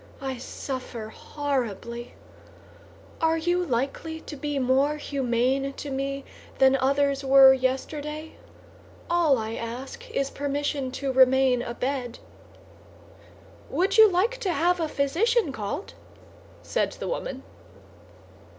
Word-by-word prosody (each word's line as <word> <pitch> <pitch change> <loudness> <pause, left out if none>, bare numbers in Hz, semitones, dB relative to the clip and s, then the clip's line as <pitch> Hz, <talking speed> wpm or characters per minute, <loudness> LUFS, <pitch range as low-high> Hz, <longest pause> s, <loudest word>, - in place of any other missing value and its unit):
I 265 -1 -4
suffer 245 -3 -6
horribly. 240 -4 -4 1.1
Are 325 0 +3
you 350 +2 +1
likely 280 +3 -2
to 300 - -8
be 290 0 -3
more 270 +3 +2
humane 270 0 0
to 285 +1 -7
me 275 +1 -3 0.3
than 265 0 +5
others 275 +1 +1
were 270 0 +8
yesterday? 295 +4 -3 0.8
All 335 -6 +4
I 220 0 -4
ask 250 - -6
is 275 -11 -1
permission 285 -1 -2
to 275 0 -2
remain 260 -1 +5
abed." 245 0 -3 1.5
"Would 380 +5 +1
you 440 -1 +10
like 415 +8 +1
to 380 - -1
have 350 +1 +2
a 325 - 0
physician 330 - +1
called?" 265 - -5 0.7
said - - -1
the - - -6
woman. - - -4
275 Hz, 115 wpm, -26 LUFS, 260-310 Hz, 1.5 s, you